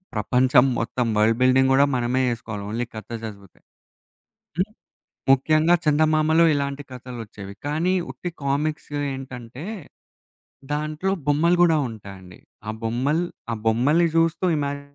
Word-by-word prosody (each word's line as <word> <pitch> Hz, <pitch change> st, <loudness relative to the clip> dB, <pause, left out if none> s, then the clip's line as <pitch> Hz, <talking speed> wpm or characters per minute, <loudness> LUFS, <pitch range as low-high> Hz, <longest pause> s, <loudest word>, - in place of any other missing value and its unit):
ప్రపంచం 125 Hz, +4 st, +4 dB
మొత్తం 120 Hz, +1 st, -1 dB
world 110 Hz, +2 st, +3 dB
building 130 Hz, +1 st, +4 dB
కూడా 140 Hz, +1 st, +5 dB
మనమే 125 Hz, +2 st, 0 dB
ఏసుకోవాలి. 110 Hz, -3 st, -7 dB
ఓన్లీ 115 Hz, +3 st, -2 dB
కథ 110 Hz, -, -8 dB, 0.2 s
చదువుతే 100 Hz, -3 st, -10 dB, 1.0 s
హ్మ్. 200 Hz, +3 st, 0 dB, 0.6 s
ముఖ్యంగా 155 Hz, +5 st, +4 dB
చందమామలో 155 Hz, +2 st, +3 dB
ఇలాంటి 140 Hz, 0 st, -2 dB
కథలొచ్చేవి. 115 Hz, -6 st, -9 dB
కానీ 160 Hz, +5 st, +1 dB, 0.2 s
ఉట్టి 175 Hz, -, -6 dB
కామిక్స్ 150 Hz, +3 st, -1 dB, 0.2 s
ఏంటంటే 130 Hz, +1 st, -8 dB, 1.1 s
దాంట్లో 155 Hz, +5 st, -1 dB
బొమ్మలు 165 Hz, +4 st, +3 dB
కూడా 160 Hz, -2 st, +3 dB
ఉంటాయండి. 95 Hz, -4 st, -12 dB, 0.3 s
ఆ -, -, 0 dB
బొమ్మల్ 130 Hz, +8 st, 0 dB, 0.3 s
ఆ -, -, 0 dB
బొమ్మల్ని 145 Hz, +10 st, +3 dB
చూస్తూ 165 Hz, +2 st, +2 dB
ఇమాజిన్ 140 Hz, 0 st, -4 dB
135 Hz, 115 wpm, -23 LUFS, 115-155 Hz, 1.1 s, కూడా